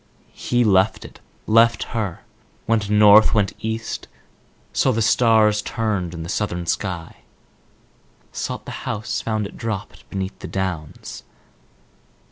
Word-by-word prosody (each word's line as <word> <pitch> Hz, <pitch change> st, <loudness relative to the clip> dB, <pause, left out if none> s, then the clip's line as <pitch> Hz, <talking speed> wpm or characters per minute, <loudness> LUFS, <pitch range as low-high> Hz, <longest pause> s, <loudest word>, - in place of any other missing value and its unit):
He 120 Hz, 0 st, 0 dB
left 95 Hz, -1 st, +2 dB
it, -, -, -13 dB, 0.3 s
left 115 Hz, +2 st, +4 dB
her, 105 Hz, -7 st, -3 dB, 0.4 s
went 110 Hz, -3 st, +1 dB
North, 105 Hz, +1 st, +7 dB
went 100 Hz, -2 st, +1 dB
East, 110 Hz, 0 st, -4 dB, 0.7 s
saw -, -, +3 dB
the 110 Hz, -, -1 dB
stars 110 Hz, -2 st, +4 dB
turned 100 Hz, -7 st, -2 dB
in 80 Hz, -, -6 dB
the -, -, -7 dB
Southern 90 Hz, -2 st, -2 dB
sky; 85 Hz, -1 st, -3 dB, 1.1 s
sought -, -, -4 dB
the -, -, -7 dB
house, 105 Hz, +1 st, -2 dB
found 110 Hz, -2 st, -1 dB
it 100 Hz, -, -9 dB
dropped 110 Hz, -4 st, -5 dB
beneath 95 Hz, 0 st, -4 dB
the -, -, -7 dB
Downs. 90 Hz, -6 st, -4 dB
105 Hz, 125 wpm, -22 LUFS, 95-110 Hz, 1.1 s, North